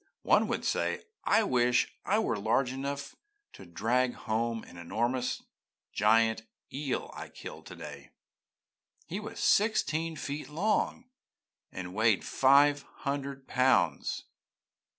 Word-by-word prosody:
One - - +4
would - - -2
say - - 0 0.2
'I 225 - +4
wish 125 - +2
I 205 - +2
were 115 - 0
large 120 +5 +1
enough 140 +1 -4 0.4
to 95 - -12
drag 120 +8 +1
home 115 0 -1
the - - -14
enormous 120 +8 -1 0.5
giant 110 +2 +3 0.3
eel 140 -1 -2
I - - -8
killed - - -10
today. - - -9 1.0
He 190 - -4
was 210 - -7
sixteen 165 -6 +2
feet 145 0 -5
long, 210 +9 0 0.6
and 90 -1 -6
weighed 110 0 +3
five 140 +2 +5 0.2
hundred 140 -1 -3
pounds.' 130 0 +2
130 Hz, 115 wpm, -30 LUFS, 115-145 Hz, 1.0 s, five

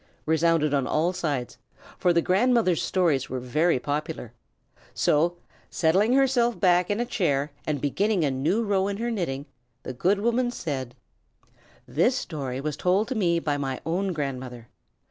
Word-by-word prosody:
resounded 160 -1 +2
on 135 -2 +1
all 165 +4 +1
sides, 145 -9 -3 0.4
for 180 - +3
the 170 -1 +2
grandmother's 205 -3 +2
stories 160 -8 +1
were 130 - -3
very 150 +6 +1
popular; 145 -3 -4 0.6
so, 170 +4 +2 0.3
settling 190 +8 +2
herself 255 -3 +2
back 180 -2 +3
in 205 - 0
her 240 - 0
chair, 150 - 0 0.2
and 150 -2 -1
beginning 190 +5 +1
a 140 - +1
new 160 - 0
row 200 -2 +1
in 200 0 -3
her 235 +2 -2
knitting, 145 -10 -3 0.4
the 130 - -5
good 190 +11 +1
woman 235 +3 +1
said: 135 - -5 0.9
"This 240 - +2
story 135 - -4
was 150 +1 -3
told 190 +6 +1
to 260 - -2
me 175 -6 +2
by 150 -3 -1
my 135 -2 -3
own 185 +4 -1
grandmother. 130 -6 -5
170 Hz, 160 wpm, -25 LUFS, 140-200 Hz, 0.9 s, for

